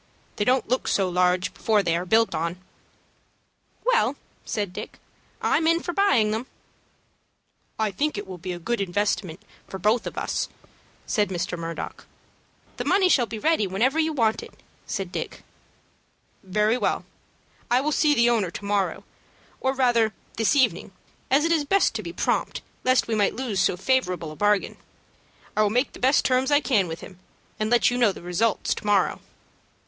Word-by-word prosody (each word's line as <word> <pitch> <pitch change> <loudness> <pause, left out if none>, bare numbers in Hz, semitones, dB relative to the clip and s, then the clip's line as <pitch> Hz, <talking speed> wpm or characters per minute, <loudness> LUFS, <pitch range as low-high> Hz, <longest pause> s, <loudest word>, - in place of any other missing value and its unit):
They 205 - 0
don't 255 +1 +2
look 255 +3 -1
so 195 -2 +2
large 180 0 +1
before 215 -2 +1
they 170 -2 +1
are 175 +2 -3
built 225 +4 +3
on." 170 +2 -2 1.3
"Well," - - +2 0.3
said 205 -4 -3
Dick, - - -7 0.5
"I'm 320 - +2
in 335 +1 +4
for 350 - -4
buying 340 - +3
them." 225 +4 -3 1.3
"I 220 -2 0
think 290 +6 -1
it 205 - -4
will 185 -2 -9
be 185 +2 -5
a 175 - -4
good 220 +6 -2
investment 195 -1 -1 0.2
for 190 - -6
both 215 +5 +1
of - - -7
us," - - -2 0.6
said 210 -4 +1
Mr. 175 -1 -3
Murdock. 165 -1 -6 0.7
"The - - -2
money 380 -1 +3
shall 245 -8 +3
be 225 - -6
ready 260 -4 +1
whenever 240 +11 +1
you 320 0 +2
want 230 -7 +1
it," - - -14 0.2
said 195 -4 -4
Dick. - - -5 1.0
"Very 210 +5 +1
well. - - -1 0.6
I 245 - +4
will 295 +3 -1
see 295 0 +3
the 235 -1 +4
owner 225 -6 +2
to 200 - -8
morrow, 200 -1 0 0.6
or 265 - +1
rather 240 -5 +2 0.2
this 225 +7 +2
evening, 265 -3 +1 0.4
as 285 +4 +3
it 335 - +1
is 320 -3 +2
best 390 +7 +2
to 220 - -3
be 170 -4 -6
prompt, 175 - -1 0.2
lest 255 0 +3
we 230 - -2
might 205 -2 +1
lose 235 -6 -2
so 180 - +2
favorable 185 -8 0
a - - -9
bargain. 205 +2 +1 0.8
I 215 - +3
will 210 - +3
make 245 +6 0
the - - -11
best 265 +3 +3
terms 255 +1 +2
I 290 -1 +5
can 215 -11 +1
with 165 0 -6
him, 185 -2 -12 0.4
and 215 0 0
let 240 +1 +4
you 245 - -1
know 235 -4 +4
the 185 - -11
result 195 +5 0
to - - -1
morrow." 205 -2 +1
215 Hz, 180 wpm, -25 LUFS, 190-260 Hz, 1.3 s, I